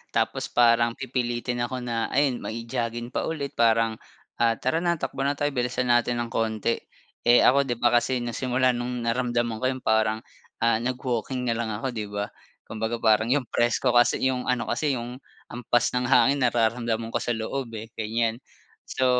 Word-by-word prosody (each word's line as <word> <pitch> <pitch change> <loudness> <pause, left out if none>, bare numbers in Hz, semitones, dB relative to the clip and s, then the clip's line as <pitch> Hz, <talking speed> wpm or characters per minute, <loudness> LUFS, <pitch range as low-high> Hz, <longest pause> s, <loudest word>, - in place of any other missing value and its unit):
tapos 115 +3 0
parang 115 -1 +3
pipilitin 120 -2 -2
ako 125 0 -5
na 115 -2 -1
ayun 140 -3 +2
mai-jogging 115 +1 -4
pa - - -2
ulit 145 -4 -3
parang, 115 -1 +2 0.4
ah, 115 -1 +3
"Tara 130 +8 0
na 170 0 +1
takbo 135 - -5
na 145 - 0
tayo 145 0 -1
bilisan 125 -1 0
natin 120 0 +2
ng 115 - -8
konti." 110 0 0 0.5
Eh, 120 0 +7
ako 140 +1 +4
di 120 - -1
ba 120 0 +3
kasi 125 +2 +2
na 120 - -3
simula 130 +1 +1
nung 120 0 -3
naramdaman 120 -1 0
ko 130 - -1
yung 130 -1 -5
parang, 110 0 +1 0.4
ah, 115 -1 +3
nag-walking 125 0 -2
na 115 - +1
lang 115 - -2
ako, 115 +5 -3
'di 105 -2 -4
ba. 105 0 -4 0.3
Kumbaga 110 +1 -3
parang 110 -1 +3
yung 140 0 +2
presko 120 +2 +2
kasi 120 +2 +3
yung 125 -1 -4
ano 125 -2 +1
kasi 140 +3 0
yung 120 +1 -6 0.3
hampas 120 0 +1
ng 125 0 -1
hangin 135 +2 +4
nararamdaman 115 -1 0
ko 120 - 0
sa 120 -1 -1
loob, 125 +4 -3
eh, 110 +1 -9
ganyan. 115 +1 -1 0.5
So 130 - -1
120 Hz, 180 wpm, -25 LUFS, 115-125 Hz, 0.5 s, Eh